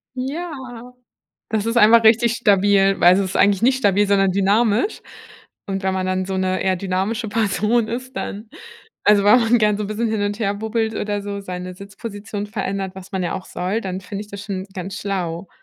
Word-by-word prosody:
Ja, 305 +7 -4 1.0
das 220 -1 -1
ist 230 +1 -1
einfach 225 +1 +6
richtig 235 +1 +5
stabil, 200 -3 +3
weil 180 +1 +7
es 195 - +2
ist 190 -1 -2
eigentlich 200 0 +3
nicht 260 +2 +3
stabil, 205 -3 +3
sondern 195 -1 +3
dynamisch. 210 - +1 0.7
Und 195 0 -3
wenn 190 0 0
man 185 0 -1
dann 185 0 -1
so 190 -1 -3
'ne 185 0 0
eher 190 -1 +1
dynamische 195 +5 -2
Person 215 +2 +1
ist, 255 +2 -6
dann 215 +2 -5 0.6
also, 205 -1 +5
wenn 215 +4 +6
man 230 +1 +3
gern 210 -1 +2
so 210 - -2
'n - - -4
bisschen 220 +2 -1
hin 215 -2 -1
und 205 +1 -2
her 200 -3 0
bubbelt 220 +1 -2
oder 205 -1 -2
so, 200 0 -5
seine 180 -1 -6
Sitzposition 205 +1 -7
verändert, 195 -2 -4
was 190 0 -11
man 190 - -1
ja 175 - -2
auch 185 - -6
soll, 190 +6 -2
dann 190 -2 -5
finde 195 +2 -6
ich 210 - -15
das 200 0 -8
schon 195 -2 -5
ganz 190 +1 -6
schlau. 180 -3 -3
205 Hz, 205 wpm, -20 LUFS, 190-220 Hz, 1.0 s, weil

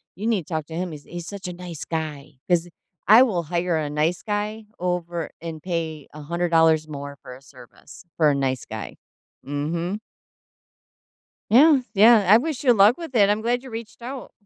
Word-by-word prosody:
you 205 - -6
need 215 -8 0
to 170 - -7
talk 155 -2 -2
to 160 - -8
him. 175 0 -3
He's 145 -2 -9
he's 175 -1 -8
such 200 -2 -7
a 180 - -5
nice 175 -3 -8
guy 155 -3 -5 0.2
'cause 175 0 +2 0.4
I 225 +5 +9
will 185 -9 0
hire 170 +1 -1
a 150 -2 -2
nice 155 +4 -1
guy 210 +1 -3
over 175 -2 -2
and 165 -2 -7
pay 160 -4 -4
$100 160 0 +2
more 140 -1 -7
for 125 - -10
a 130 - -15
service 135 +4 -16
for 155 -3 +4
a - - 0
nice 130 -2 -1
guy, - - -7 0.5
mhm. 165 +8 -3 1.5
Yeah, 280 +5 +7
yeah. 215 -1 +6
I 215 - +9
wish 295 +1 -3
you 245 -3 +5
luck 210 +3 +5
with 325 -7 -8
it. 205 -2 +5
I'm 210 +1 +1
glad 245 +2 0
you 260 - -10
reached 230 0 -8
out. 255 +1 -7
175 Hz, 185 wpm, -23 LUFS, 155-215 Hz, 1.5 s, I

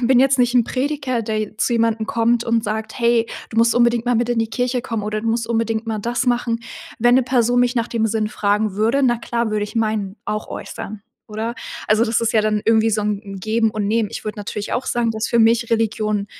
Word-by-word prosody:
bin 250 0 +4
jetzt 270 0 +3
nicht 245 0 +2
'n 245 - +6
Prediger, 260 -1 -2
der 215 0 -2
je 215 0 -5
zu 240 - 0
jemandem 225 -1 +1
kommt 235 +1 +1
und 230 -1 +1
sagt: 220 0 -4
„Hey, 235 -1 +2 0.2
du 225 - -8
musst 230 0 +4
unbedingt 235 -1 +3
mal 245 0 +1
mit 235 +1 +1
in 240 - 0
die 225 - +1
Kirche 250 +1 -1
kommen 225 -3 -4
oder 215 0 -2
du 230 - -5
musst 230 0 0
unbedingt 225 -1 -1
mal 220 -1 -2
das 240 +4 -1
machen.“ 240 -1 0 0.4
Wenn 240 +2 +5
'ne 260 - +3
Person 245 -1 +2
mich 245 +1 +2
nach 235 0 0
dem 225 -1 0
Sinn 215 -1 -1
fragen 205 -1 0
würde, 230 +7 +1
na 240 -2 +3
klar, 235 -1 -2
würde 210 -1 0
ich 210 - -10
meinen 215 -3 -1
auch 215 0 -3
äußern, 210 0 -7 0.3
oder? 220 +2 -4 0.3
Also, 215 +2 +4
das 230 0 +1
ist 230 - 0
ja 220 - +4
dann 215 0 0
irgendwie 225 0 +3
so 215 - 0
'n 205 -1 -1
'n 195 -1 -8
Geben 220 +2 +1
und 210 -1 -2
Nehmen. 220 -1 +1
Ich - - -6
würde 215 0 -5
natürlich 205 0 -5
auch 255 - -2
sagen, 235 -1 0
dass 220 0 -2
für 235 - +1
mich 230 +1 +3
Religion 215 -2 0
225 Hz, 245 wpm, -20 LUFS, 215-240 Hz, 0.4 s, n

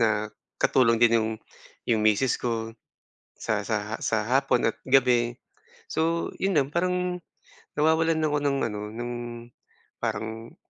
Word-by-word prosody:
na 110 -2 +2 0.3
katulong 115 -3 +4
din 115 -1 +5
'yong, 110 - -1 0.6
'yong 115 -2 +3
misis 110 +4 +3
ko 115 -2 -2 0.6
sa - - -1
sa - - -2
sa - - 0
hapon - - +2
at - - -3
gabi. 125 -3 +3 0.5
So 165 +1 0
'yon 190 -3 +1
lang 140 -2 +3
parang, 180 0 0 0.6
nawawalan 160 +1 +2
ako 150 -1 +1
ng 140 -1 +1
ano 105 -1 -5
ng 120 +1 -4 0.9
parang 110 +1 -4
120 Hz, 130 wpm, -26 LUFS, 115-160 Hz, 0.9 s, din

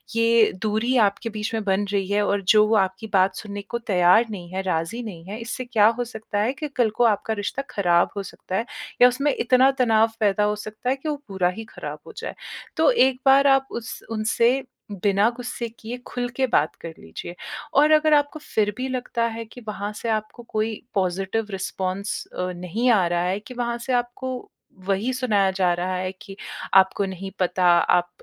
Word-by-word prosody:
ये 230 -1 +4
दूरी 220 +4 0
आपके 200 +3 -2
बीच 215 +1 -4
में 220 -1 -1
बन 200 0 +1
रही 195 -2 0
है 205 +1 +1
और 200 0 +1
जो 210 0 +6
वो 220 - +2
आपकी 190 +2 0
बात 190 0 +3
सुनने 205 -2 -6
को 235 - -2
तैयार 190 0 +4
नहीं 175 -4 -7
है, 190 - -1
राज़ी 185 +6 -2
नहीं 175 -7 -8
है। 205 +4 -6
इससे 240 +2 -5
क्या 220 -4 +4
हो - - +1
सकता 220 -3 -5
है 230 +5 +1
कि 300 +3 -5
कल 240 -3 +3
को 245 - +4
आपका 220 0 +1
रिश्ता 205 +6 -3
ख़राब 175 -3 +3
हो 200 - -2
सकता 185 - -7
है 225 - 0 0.4
या - - +11
उसमें 275 +3 +1
इतना 255 +2 +4
तनाव 225 -2 +4
पैदा 210 -1 +2
हो 210 0 +1
सकता 215 +4 -4
है 265 - +2
कि 305 +3 -5
वो 300 - 0
पूरा 190 -3 +1
ही 225 - -6
ख़राब - - -7
हो - - -10
जाए। - - -5 0.4
तो - - +5
एक 265 - +3
बार 275 +1 +6
आप 270 0 +4
उस 230 -1 -6
उनसे 230 +4 +2 0.4
बिना 200 +2 +4
गुस्से 245 -1 -4
किए 235 +3 -6
खुल 245 0 -3
के 265 - +3
बात 155 -8 +1
कर 165 -1 -7
लीजिए 125 - -8 0.4
और 300 +1 +5
अगर 310 0 +5
आपको 290 +1 +2
फ़िर 210 -8 -1
भी 255 +1 -2
लगता 250 -2 -2
है 230 - -5
कि 245 +3 -13
वहाँ 205 -1 -4
से 225 +2 -5
आपको 215 +2 -3
कोई 215 0 -2
पॉज़िटिव 195 +3 -1
रिस्पॉन्स 190 +1 -3
अ, 180 0 -4
नहीं 180 +8 -1
आ 200 -6 +4
रहा 175 0 0
है 185 +3 0
कि 215 +4 -11
वहाँ 235 -1 -2
से 255 +2 -3
आपको 245 +1 -3 0.4
वही 200 +6 +1
सुनाया 210 -7 +2
जा 185 -2 +2
रहा 180 +1 -2
है 185 0 -2
कि 195 -2 -10 0.4
आपको 190 +1 +5
नहीं 190 0 -6
पता 180 0 +1
आप 175 0 +4
215 Hz, 205 wpm, -23 LUFS, 190-245 Hz, 0.4 s, या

